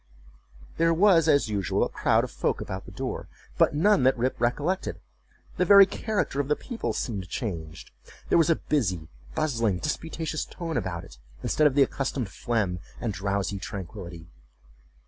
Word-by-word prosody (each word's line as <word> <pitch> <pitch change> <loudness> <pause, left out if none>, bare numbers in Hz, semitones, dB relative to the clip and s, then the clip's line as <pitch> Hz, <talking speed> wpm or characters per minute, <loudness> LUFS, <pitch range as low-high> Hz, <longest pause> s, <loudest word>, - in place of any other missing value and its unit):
There 165 0 +3
was, 170 -3 +5
as 140 -5 +4
usual, 100 -4 0
a - - +1
crowd - - +2
of - - -5
folk - - -1
about 95 0 -6
the - - -11
door, - - -4 0.3
but - - +4
none 205 +3 +4
that 130 +1 +4
Rip 125 +2 -1
recollected. 145 +10 0 0.6
The - - +3
very 200 +1 +9
character 205 -7 -2
of 140 - 0
the 150 - +2
people 240 - -4
seemed 100 -6 -4
changed. 80 -9 -5 0.4
There - - +4
was 165 - +3
a 165 - +5
busy, 95 - -1 0.3
bustling, 115 - +1
disputatious 160 - -3
tone 165 -3 -6
about 90 -8 -2
it, - - -14 0.2
instead 155 - +3
of 135 - -1
the 140 - +7
accustomed 135 -4 -2
phlegm 105 -6 -1 0.2
and 115 -4 -2
drowsy 100 0 -2
tranquillity. 90 -3 -7
125 Hz, 165 wpm, -27 LUFS, 95-160 Hz, 0.6 s, very